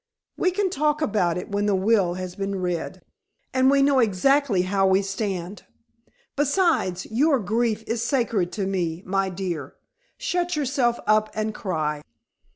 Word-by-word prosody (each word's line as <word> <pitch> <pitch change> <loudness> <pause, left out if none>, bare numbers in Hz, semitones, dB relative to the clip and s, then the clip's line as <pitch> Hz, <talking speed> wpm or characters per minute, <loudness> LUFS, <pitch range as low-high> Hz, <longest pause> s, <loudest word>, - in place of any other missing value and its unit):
"We 370 - +1
can 380 0 -1
talk 300 -2 +1
about 200 - +1
it 180 - -6
when 205 +1 0
the 205 - +2
will 190 -2 +2
has 185 -1 -5
been 195 -1 -3
read, 180 -2 -3 0.5
and 260 0 +4
we 275 0 +4
know 275 -1 +4
exactly 230 0 +2
how 195 +1 +1
we 190 +1 +3
stand. 195 -1 -4 0.7
Besides 285 - +1
your 280 +5 +3
grief 220 0 -1
is 230 0 -2
sacred 230 -8 0
to 200 - -2
me, 180 -3 -2
my 195 0 0
dear. 175 -6 -5 0.4
Shut 355 -1 -1
yourself 265 -4 0
up 215 0 +3
and 215 0 -2
cry." 155 -7 -2
210 Hz, 155 wpm, -24 LUFS, 185-265 Hz, 0.7 s, and